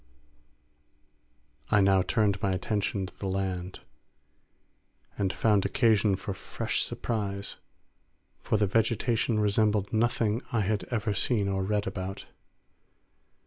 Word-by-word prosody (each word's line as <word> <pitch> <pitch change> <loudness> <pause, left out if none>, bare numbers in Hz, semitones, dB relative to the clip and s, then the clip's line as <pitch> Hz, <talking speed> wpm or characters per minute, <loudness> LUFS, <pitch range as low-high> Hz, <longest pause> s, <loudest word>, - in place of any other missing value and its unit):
I 105 - +4
now 95 -1 +4
turned 100 +1 +1
my 95 -1 +1
attention 100 0 -1
to 95 - -11
the 100 - -3
land, 95 -1 -3 1.3
and 95 -2 0
found 105 -3 +2
occasion 110 -6 +3
for 95 +1 -5
fresh - - -3
surprise; 100 -3 -3 0.8
for 110 - 0
the 105 - +3
vegetation 115 +2 +1
resembled 105 -1 +2
nothing 115 0 +1
I 115 - +1
had 100 -2 -1
ever 110 0 -1
seen 100 0 +1
or 95 -1 0
read 105 +1 0
about. 95 0 -5
100 Hz, 115 wpm, -28 LUFS, 95-110 Hz, 1.3 s, I